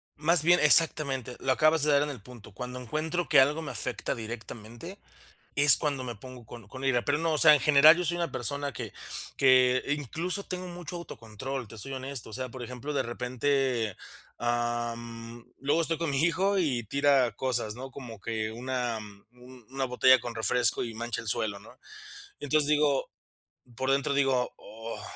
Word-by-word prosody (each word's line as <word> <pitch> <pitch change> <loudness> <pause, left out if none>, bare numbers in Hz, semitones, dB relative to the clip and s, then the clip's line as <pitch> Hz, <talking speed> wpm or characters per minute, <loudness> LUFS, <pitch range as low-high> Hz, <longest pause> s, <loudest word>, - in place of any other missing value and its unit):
Más 155 +1 +3
bien 175 +2 +5
Exactamente, 140 -5 +3
lo 135 - 0
acabas 155 +3 +3
de 150 - +3
dar 145 0 +4
en 150 - -3
el 130 -7 -8
punto. 115 -2 -14
Cuando 125 +5 -6
encuentro 155 +7 -3
que 150 -4 +5
algo 150 +4 +1
me 145 - -6
afecta 120 0 -1
directamente, 115 - -9 0.6
es 145 0 +8
cuando 140 -3 -2
me 120 -1 -5
pongo 125 +2 -12
con 115 -4 -12
con 130 +3 -8
ira, 125 -3 +1
pero 145 +1 +1
no, 165 0 0
o 155 - 0
sea, 155 -1 +8
en 145 - +1
general 150 +2 +7
yo 180 - -2
soy 170 +1 0
una 170 -4 -2
persona 140 +4 -3
que - - -7 0.4
que 130 -1 +4
incluso 160 - -2
tengo 185 0 -5
mucho 175 -1 -7
autocontrol, 130 -3 -7
te 115 - -11
soy 135 +6 -5
honesto, 130 -4 -5
o - - -13
sea, 130 +2 -4
por 125 0 -9
ejemplo, 125 +4 -6
de 145 - 0
repente, 125 -2 -1 0.4
ah, 120 0 -1
mm, 115 0 -10 0.2
luego 145 +5 +1
estoy 165 -1 -1
con 165 -2 -2
mi 135 -1 0
hijo 190 +4 +1
y 135 -10 0
tira 140 0 +2
cosas, 120 -2 -2
¿no?, 130 +2 -8
como 120 -5 -10
que 110 +1 -3
una 125 -1 -3 0.3
una 125 +1 -8
botella 130 +1 +5
con 120 -1 -7
refresco 115 +3 +1
y 115 -2 -7
mancha 120 +1 -4
el - - -12
suelo, 105 -1 -1
¿no?, 110 +5 -16 0.6
entonces, 145 +1 +1
digo, 150 -2 +1 0.7
por 130 +1 -1
dentro 140 0 +1
digo: 135 -3 +1
"Oh", 115 0 -9
130 Hz, 185 wpm, -28 LUFS, 120-150 Hz, 0.7 s, es